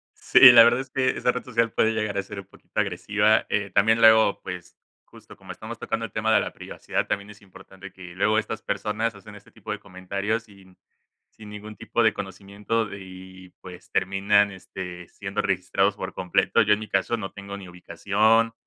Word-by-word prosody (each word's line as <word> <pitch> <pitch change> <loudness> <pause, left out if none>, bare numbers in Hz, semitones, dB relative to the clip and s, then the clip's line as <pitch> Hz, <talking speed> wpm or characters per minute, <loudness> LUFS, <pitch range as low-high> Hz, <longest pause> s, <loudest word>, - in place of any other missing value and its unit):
Sí, - - +3
la 115 -1 +9
verdad 120 +2 +3
es 130 0 -8
que 130 -1 +1
esa 125 - 0
red 125 - -5
social 115 -2 0
puede 110 - +2
llegar 105 -2 -2
a - - 0
ser 100 +1 -8
un 95 - -16
poquito - - -12
agresiva. - - +1
Eh, 100 -2 -1
también 110 +4 +3
luego, 110 -2 +5
pues 90 -2 -8 0.3
justo - - -16
como - - -10
estamos - - -9
tocando 115 0 -3
el 115 - -7
tema 110 +1 +1
de 105 - +5
la - - -4
privacidad, - - -4
también 100 +1 -3
es 105 - -15
importante 95 -1 -14
que 90 -2 -12
luego 105 +4 +1
estas 110 0 -3
personas 105 +3 -2
hacen 100 -2 -13
este - - -16
tipo - - -11
de - - -6
comentarios 100 +5 -4
sin 95 -3 -19 0.5
sin 105 -1 -13
ningún 105 +1 -10
tipo 120 - -1
de 110 -1 +4
conocimiento 100 +4 -4
y, 95 -1 -12
pues, 90 -1 -13
terminan 100 +2 +2
este, 90 -2 -9
siendo - - -5
registrados - - 0
por - - -6
completo. 90 +5 +1
Yo, 105 -1 +2
en 105 - -7
mi 110 - -8
caso, 95 +4 0
no 95 -4 -6
tengo 100 0 -9
ni 95 -2 -11
ubicación, 105 +6 +1
100 Hz, 200 wpm, -24 LUFS, 95-110 Hz, 0.5 s, la